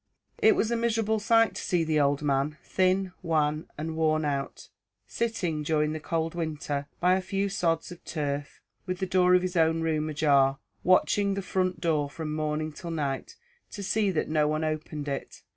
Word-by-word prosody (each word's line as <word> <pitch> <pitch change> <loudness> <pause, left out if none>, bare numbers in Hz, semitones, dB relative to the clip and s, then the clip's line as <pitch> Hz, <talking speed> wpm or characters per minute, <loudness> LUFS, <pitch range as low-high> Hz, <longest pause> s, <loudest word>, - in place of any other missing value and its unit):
It 435 -2 +5
was 225 -9 +1
a - - +2
miserable 225 -2 +1
sight 225 +1 +4
to - - -5
see 175 -2 +1
the 155 -1 +1
old 145 0 +2
man, 140 +1 0
thin, 185 0 +1
wan, 155 -3 0
and 160 +1 -4
worn 155 -1 +1
out, 140 -1 -3 0.4
sitting 180 -9 -2
during 150 0 +1
that 155 - -5
cold 165 0 -1
winter, 150 -4 -3
by 180 +1 +4
a 190 - +2
few 195 +1 -1
sods 170 -4 0
of 175 - -11
turf, 145 -2 -4 0.3
with 185 0 -2
the 190 - -1
door 180 -1 +4
of 180 - +3
his 185 0 -3
own 165 -1 +3
room 155 -1 0
ajar, 140 -3 +3 0.3
watching 200 +2 +3
the 195 - -3
front 185 -2 -1
door 155 -4 +1
from 150 +1 -5
morning 155 0 -2
till 170 +3 -8
night, 145 -5 -3 0.3
to 200 - -7
see 205 +1 +1
that 175 -5 0
no 155 -1 +2
one 155 +1 0
opened 155 -1 -3
it. 140 -1 -5
160 Hz, 190 wpm, -28 LUFS, 150-185 Hz, 0.4 s, It